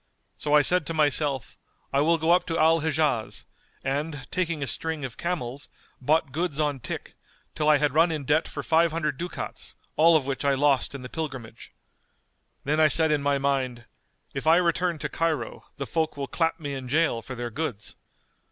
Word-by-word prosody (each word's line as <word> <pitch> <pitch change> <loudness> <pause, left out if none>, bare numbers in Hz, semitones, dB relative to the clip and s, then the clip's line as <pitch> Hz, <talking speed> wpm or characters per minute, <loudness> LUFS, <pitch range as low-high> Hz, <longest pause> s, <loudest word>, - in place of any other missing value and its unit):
So 150 0 +1
I 150 - +6
said 180 -2 +3
to 165 - -2
myself:—I 145 -2 -1
will 165 +3 +3
go 160 +1 +1
up 175 0 +3
to 165 -1 -1
Al 165 +1 +4
Hijaz; 150 -7 -1 0.4
and, 145 +1 -3
taking 170 -5 -1
a - - -1
string 160 +1 -3
of 120 -3 -7
camels, 145 -5 -4 0.3
bought 150 +1 +2
goods 155 0 -2
on 145 -3 0
tick, - - -6 0.4
till 150 0 +1
I 150 - +6
had 145 -1 +1
run 165 +2 +4
in 150 -3 -3
debt 150 +4 +2
for - - -6
five 165 +1 +3
hundred 150 -4 -2
ducats, 175 +1 -6 0.2
all 165 +2 +6
of 140 - -3
which 135 0 -3
I 140 -1 +3
lost 140 -1 +2
in 135 - -7
the - - -6
pilgrimage. 130 -8 -6 0.9
Then 150 +3 0
I 155 - +6
said 160 +1 +4
in 150 -1 +2
my 140 0 +1
mind:—If 135 +1 -4
I 160 - +7
return 175 -1 +1
to 150 0 -3
Cairo 165 0 -2
the 140 - -3
folk 160 +1 -1
will 140 - -2
clap 165 +3 0
me 145 -3 -4
in 130 -2 -6
jail 145 -4 +1
for 130 - -8
their 120 -1 -5
goods. 120 -6 -4
150 Hz, 190 wpm, -26 LUFS, 135-160 Hz, 0.9 s, I